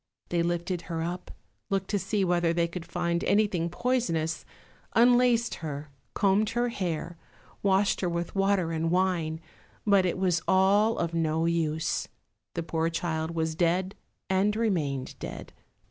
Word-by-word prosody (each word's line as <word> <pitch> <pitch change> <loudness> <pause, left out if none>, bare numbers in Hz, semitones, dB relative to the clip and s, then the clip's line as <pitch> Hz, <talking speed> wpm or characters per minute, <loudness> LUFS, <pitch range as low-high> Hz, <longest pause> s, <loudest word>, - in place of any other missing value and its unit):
They 170 -1 +1
lifted 175 +1 -1
her 165 -1 -2
up, 175 +2 -4 0.4
looked 195 -1 -1
to 205 - +1
see 195 +1 0
whether 175 -1 +2
they 170 0 +1
could 170 0 -7
find 170 -1 -1
anything 200 -5 +2
poisonous, 165 -9 -1 0.5
unlaced 240 0 +4
her, 150 -2 -5 0.2
combed 205 +1 +3
her 240 0 +2
hair, 175 -5 -3 0.4
washed 195 0 +2
her 180 - +1
with 170 0 -3
water 195 -3 +2
and 165 0 0
wine, 175 -3 +1 0.5
but 200 -3 +4
it 175 - -1
was 180 -3 +1
all 200 +4 +4
of 170 -1 -1
no 160 0 +1
use; 160 -2 0 0.5
the 170 - -2
poor 165 0 0
child 165 -1 -2
was 160 -1 0
dead, 180 +3 +1 0.3
and 195 +2 +2
remained 155 - -1
dead. - - -7
175 Hz, 145 wpm, -28 LUFS, 165-195 Hz, 0.5 s, unlaced